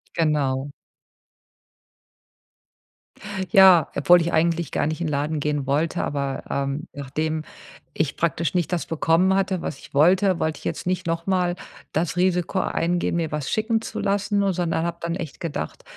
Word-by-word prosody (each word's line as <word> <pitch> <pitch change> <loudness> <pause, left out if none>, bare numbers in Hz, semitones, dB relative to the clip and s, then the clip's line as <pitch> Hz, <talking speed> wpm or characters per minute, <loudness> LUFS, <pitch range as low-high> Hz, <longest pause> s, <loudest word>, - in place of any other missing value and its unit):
Genau. 145 -4 0 2.8
Ja, 185 -5 +8
obwohl 175 +5 +5
ich 170 +1 -2
eigentlich 165 -1 +1
gar - - 0
nicht 155 +1 -3
in 165 - -1
Laden 150 +1 -1
gehen 145 -2 -1
wollte, 150 +4 0
aber, 140 -2 -3
ähm, 140 +2 -2
nachdem 155 +3 -3 0.5
ich 155 -3 -1
praktisch 165 -2 0
nicht 175 -1 0
das 170 - -1
bekommen 165 +4 +2
hatte, 190 -2 0
was 135 - -5
ich - - -15
wollte, 180 +5 +4
wollte 155 -2 -1
ich - - -16
jetzt - - -3
nicht 180 -1 -1
noch 165 0 -2
mal 180 -2 +1 0.4
das 170 +2 -1
Risiko 180 +1 +1
eingehen, 175 -1 0
mir 165 -2 -1
was 150 -3 -3
schicken 220 +1 0
zu - - -6
lassen, 200 0 0
o 195 - +2
sondern 170 -2 -1
habe 170 0 -3
dann 170 0 -2
echt 165 -6 -7
gedacht: 145 - -5
165 Hz, 160 wpm, -23 LUFS, 150-180 Hz, 2.8 s, Ja